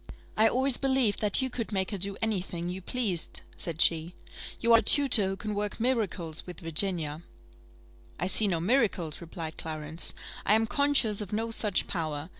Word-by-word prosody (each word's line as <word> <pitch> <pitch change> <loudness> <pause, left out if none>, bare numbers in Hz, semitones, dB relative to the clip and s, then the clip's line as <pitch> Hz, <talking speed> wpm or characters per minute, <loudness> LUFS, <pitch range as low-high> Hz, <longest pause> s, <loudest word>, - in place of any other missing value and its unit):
"I 220 +1 +4
always 260 +1 +1
believed 265 -6 +1
that 210 +5 +5
you 260 - -2
could 230 -3 -5
make 190 -1 -1
her 200 - -4 0.2
any 215 -4 +1
thing 175 -2 -6
you 185 +1 -5
pleased," 195 -5 -2
said 165 -2 -4
she. 165 +1 +1 0.4
"You 235 0 +3
are 230 - +8
a - - 0
tutor 235 -3 +5
who 195 - -2
can 215 +1 -4
work 205 +1 -3
miracles 205 -10 -1
with 180 -2 -9
Virginia." 165 -2 -1 1.0
"I 175 - -1
see 200 +3 +5
no 175 -4 0
miracles," 185 - 0
replied 165 -1 -7
Clarence; 155 0 -3 0.3
"I 210 - +4
am 225 0 +2
conscious 255 -5 +1
of 205 - -7
no 225 +2 -2
such 210 -4 0
power. 155 -3 -4
200 Hz, 180 wpm, -28 LUFS, 170-225 Hz, 1.0 s, are